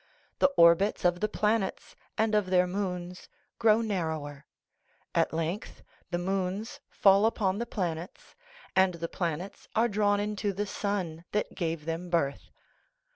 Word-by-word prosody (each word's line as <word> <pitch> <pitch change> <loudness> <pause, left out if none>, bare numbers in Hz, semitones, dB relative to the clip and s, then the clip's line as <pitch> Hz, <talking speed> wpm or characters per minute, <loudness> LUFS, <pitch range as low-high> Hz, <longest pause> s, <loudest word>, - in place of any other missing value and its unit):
The - - +5
orbits 170 +4 +5
of 175 0 +3
the 215 - 0
planets 210 -1 -1 0.2
and 220 0 +1
of 210 -3 +2
their 180 -1 +4
moons 180 -1 -4 0.3
grow 225 -1 +5
narrower. 160 -9 -3 0.7
At - - +2
length 165 +5 -4 0.3
the 175 - -1
moons 190 +3 -2
fall 200 +2 +5
upon 200 -3 0
the 235 - -3
planets, 175 -4 -4 0.4
and 190 -2 +4
the 170 0 -4
planets 175 +2 -4
are 225 +2 +4
drawn 205 -1 +2
into 205 -1 -2
the 205 +2 -2
sun 190 -5 -3
that 210 - -1
gave 165 -4 -3
them 165 +2 -4
birth. 145 -5 -1
190 Hz, 140 wpm, -29 LUFS, 170-210 Hz, 0.7 s, The